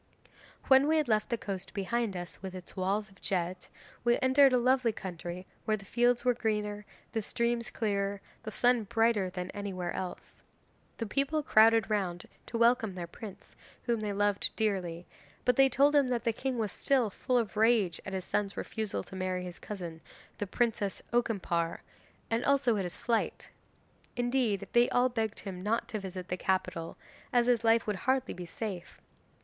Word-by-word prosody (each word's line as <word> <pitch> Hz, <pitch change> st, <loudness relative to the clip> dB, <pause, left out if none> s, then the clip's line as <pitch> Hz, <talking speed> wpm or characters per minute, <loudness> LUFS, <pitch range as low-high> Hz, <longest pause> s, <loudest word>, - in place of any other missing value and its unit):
'When 265 Hz, +1 st, +6 dB
we 315 Hz, +1 st, +3 dB
had 305 Hz, -3 st, +1 dB
left 215 Hz, 0 st, +1 dB
the 235 Hz, -, 0 dB
coast 195 Hz, -3 st, -6 dB
behind 210 Hz, 0 st, -1 dB
us, 175 Hz, 0 st, -7 dB
with 190 Hz, -1 st, -6 dB
its 185 Hz, -1 st, -10 dB
walls 200 Hz, +2 st, -1 dB
of 190 Hz, -, -22 dB
jet, 180 Hz, -1 st, -2 dB, 0.3 s
we 240 Hz, 0 st, +4 dB
entered 265 Hz, +1 st, +6 dB
a 250 Hz, -, +4 dB
lovely 255 Hz, -1 st, +3 dB
country 180 Hz, -2 st, -6 dB, 0.2 s
where 215 Hz, -1 st, +1 dB
the 195 Hz, -, -13 dB
fields 240 Hz, +4 st, +2 dB
were 250 Hz, -, +5 dB
greener, 210 Hz, -3 st, -2 dB, 0.2 s
the 225 Hz, -, -1 dB
streams 235 Hz, +2 st, -1 dB
clearer, 200 Hz, -3 st, -1 dB
and 200 Hz, -, -9 dB, 0.2 s
the 215 Hz, -, -6 dB
sun 245 Hz, 0 st, +3 dB
brighter 225 Hz, -2 st, +2 dB
than 180 Hz, 0 st, -5 dB
anywhere 190 Hz, -4 st, -4 dB
else. 185 Hz, -1 st, -6 dB, 0.6 s
The 230 Hz, -, -2 dB
people 280 Hz, +7 st, 0 dB
crowded 225 Hz, -2 st, +5 dB
round 180 Hz, -4 st, -1 dB, 0.2 s
to 230 Hz, -, -3 dB
welcome 235 Hz, -4 st, +3 dB
their 175 Hz, -2 st, -4 dB
prince, 195 Hz, +3 st, -11 dB, 0.3 s
whom 235 Hz, -2 st, 0 dB
they 210 Hz, -1 st, -2 dB
loved 205 Hz, 0 st, +1 dB
dearly, 180 Hz, -6 st, -1 dB, 0.4 s
but 250 Hz, -, +4 dB
they 270 Hz, +1 st, +6 dB
told 280 Hz, +3 st, +4 dB
him 285 Hz, -2 st, +5 dB
that 240 Hz, -2 st, 0 dB
the 230 Hz, -2 st, +1 dB
king 260 Hz, +2 st, -2 dB
was 215 Hz, -4 st, -1 dB
still 255 Hz, -6 st, +1 dB
full 250 Hz, +6 st, 0 dB
of 230 Hz, -3 st, -1 dB
rage 215 Hz, -6 st, +3 dB
at 190 Hz, -, -6 dB
his 190 Hz, -1 st, -3 dB
son's 200 Hz, -1 st, -1 dB
refusal 220 Hz, -2 st, -3 dB
to 190 Hz, -, -11 dB
marry 185 Hz, -1 st, -2 dB
his 180 Hz, -1 st, -7 dB
cousin 175 Hz, -6 st, -7 dB, 0.4 s
the 205 Hz, -, -2 dB
Princess 210 Hz, -2 st, -1 dB
Okimpare, 190 Hz, -8 st, 0 dB, 0.5 s
and 230 Hz, +1 st, +1 dB
also 275 Hz, -4 st, +3 dB
at 195 Hz, -, -1 dB
his 175 Hz, -, -6 dB
flight. 230 Hz, -2 st, -1 dB, 0.6 s
Indeed, 245 Hz, -4 st, 0 dB
they 240 Hz, +1 st, +5 dB
all 250 Hz, +1 st, +3 dB
begged 225 Hz, -3 st, -2 dB
him 185 Hz, -3 st, -6 dB
not 220 Hz, +4 st, 0 dB
to 220 Hz, -3 st, -3 dB
visit 185 Hz, -2 st, -6 dB
the 180 Hz, -, -1 dB
capital, 180 Hz, -3 st, -1 dB, 0.3 s
as 240 Hz, -1 st, +4 dB
his 240 Hz, -2 st, +3 dB
life 230 Hz, 0 st, +4 dB
would 210 Hz, -2 st, -1 dB
hardly 260 Hz, 0 st, +2 dB
be 180 Hz, -1 st, -7 dB
safe. 190 Hz, -1 st, -6 dB
215 Hz, 185 wpm, -31 LUFS, 190-240 Hz, 0.6 s, When